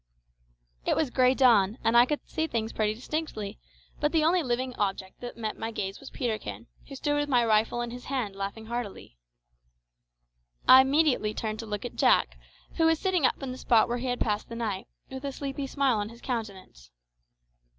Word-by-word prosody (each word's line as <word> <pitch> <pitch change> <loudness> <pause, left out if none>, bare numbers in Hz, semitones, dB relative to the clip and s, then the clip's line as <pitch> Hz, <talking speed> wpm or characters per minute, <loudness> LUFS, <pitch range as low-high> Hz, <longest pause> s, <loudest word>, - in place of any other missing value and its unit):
It - - +1
was 295 -6 0
grey 255 0 +4
dawn, 225 -5 +4
and 230 - +2
I 240 +1 +7
could 295 +1 -3
see 320 -1 -1
things 225 -5 -2
pretty 215 -1 0
distinctly; 230 -6 -4 0.4
but 295 0 +1
the 320 -2 +3
only 345 +3 +3
living 255 -2 -1
object 195 -3 -3
that 245 -1 -7
met 220 -2 -4
my 225 - -3
gaze 195 -3 -4
was 275 - -10
Peterkin, 210 - -4 0.2
who 275 - -9
stood 290 +2 0
with 290 0 -1
my 245 -3 +4
rifle 220 +2 +2
in 240 -1 -4
his 245 +1 -9
hand 250 -8 -2
laughing 200 +3 -5
heartily! 220 - -6 1.5
I 260 +1 +10
immediately 265 -6 +2
turned 215 -1 -3
to 225 - -6
look 210 -1 -4
at - - -7
Jack, - - +3 0.4
who 325 - +4
was 325 0 +3
sitting 365 -6 +2
up 275 - -4
in 265 - -3
the 255 - -7
spot 230 -1 +4
where 240 +1 -2
he 260 - -3
had 245 0 -1
passed 210 -1 -1
the 230 - -6
night, 210 -5 -3 0.2
with 265 +1 -7
a 280 - -2
sleepy 275 0 -4
smile 270 -3 +1
on 205 +1 -3
his 235 +1 -13
countenance. 200 - -6
240 Hz, 200 wpm, -28 LUFS, 215-270 Hz, 1.5 s, I